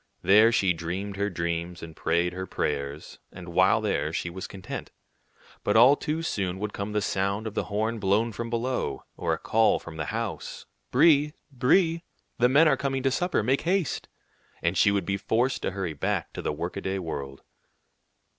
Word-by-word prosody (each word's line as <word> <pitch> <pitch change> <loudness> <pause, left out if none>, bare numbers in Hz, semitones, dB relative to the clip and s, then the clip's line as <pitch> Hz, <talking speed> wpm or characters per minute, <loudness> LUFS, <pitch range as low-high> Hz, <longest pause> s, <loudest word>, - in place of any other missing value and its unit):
There 105 +5 +6
she 95 -5 +3
dreamed 90 +5 -4
her 100 +1 0
dreams 85 -1 -3
and 80 -1 -9
prayed 85 +2 0
her 95 +1 -5
prayers, 70 -1 -3
and 90 -1 -10
while 95 +6 +4
there 80 -8 0
she 85 +1 -3
was 95 +1 -6
content. 95 -1 -7 0.7
But 105 - +2
all 125 +5 +8
too 160 +2 -3
soon 95 - -2
would 105 +1 -4
come 100 +1 -4
the 105 -1 0
sound 100 +3 -1
of 110 - -4
the - - -1
horn 110 +2 -1
blown 105 +4 +2
from 115 +2 -5
below, 115 - -2
or - - -2
a - - -1
call 110 0 +3
from 80 -1 -10
the 80 - -2
house, - - -4 0.2
"Brie, 150 +1 +4 0.2
Brie, 165 +6 +2 0.4
the 125 +1 +5
men 150 +5 +6
are 135 -3 +3
coming 135 -1 -2
to 135 - +2
supper; 175 - 0
make 130 +5 +1
haste!" 175 -3 0 0.6
and - - +1
she - - +5
would 100 -3 0
be 100 +2 -1
forced 115 +6 0
to - - -1
hurry 95 -4 -3
back 70 - -2
to - - -5
the - - -1
workaday 95 +5 -3
world. 70 -6 -6
100 Hz, 185 wpm, -27 LUFS, 85-125 Hz, 0.7 s, all